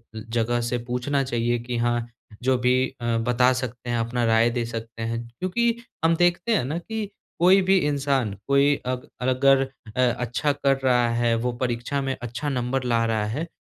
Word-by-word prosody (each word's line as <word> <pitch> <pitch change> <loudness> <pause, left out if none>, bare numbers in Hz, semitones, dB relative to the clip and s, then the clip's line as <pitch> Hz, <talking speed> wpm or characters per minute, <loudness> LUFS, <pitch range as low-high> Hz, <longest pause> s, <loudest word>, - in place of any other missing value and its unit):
जगह 115 +2 -1
से 120 +1 -1
पूछना 135 +3 0
चाहिए 120 -1 0
कि 120 0 -4
हाँ, 120 0 0 0.4
जो 130 0 +3
भी 125 +1 +2 0.3
अ, 120 -1 0
बता 125 +2 +3
सकते 120 -1 -6
हैं, 120 - 0
अपना 120 +1 -1
राय 115 +1 +4
दे 120 -1 -2
सकते 115 0 -6
हैं, 115 +1 -3
क्योंकि 235 +6 +1 0.3
हम 165 0 +4
देखते 175 +6 +2
हैं - - +1
ना 155 +5 -2
कि 215 +3 -4 0.3
कोई 185 +3 +6
भी 195 0 +5
इंसान 135 -7 0
कोई 140 +1 +4
अग 125 0 -3
अगर 135 +1 +4 0.3
अ, - - +3
अच्छा 125 +3 +1
कर 140 -1 +1
रहा 125 -2 +3
है, 115 0 +1
वो 125 +2 -1
परीक्षा 125 +3 -1
में 135 -1 -2
अच्छा 120 +5 -4
नंबर 125 0 -1
ला 115 -2 +1
रहा 110 -2 0
है, 145 +11 -3
125 Hz, 185 wpm, -24 LUFS, 120-140 Hz, 0.4 s, कोई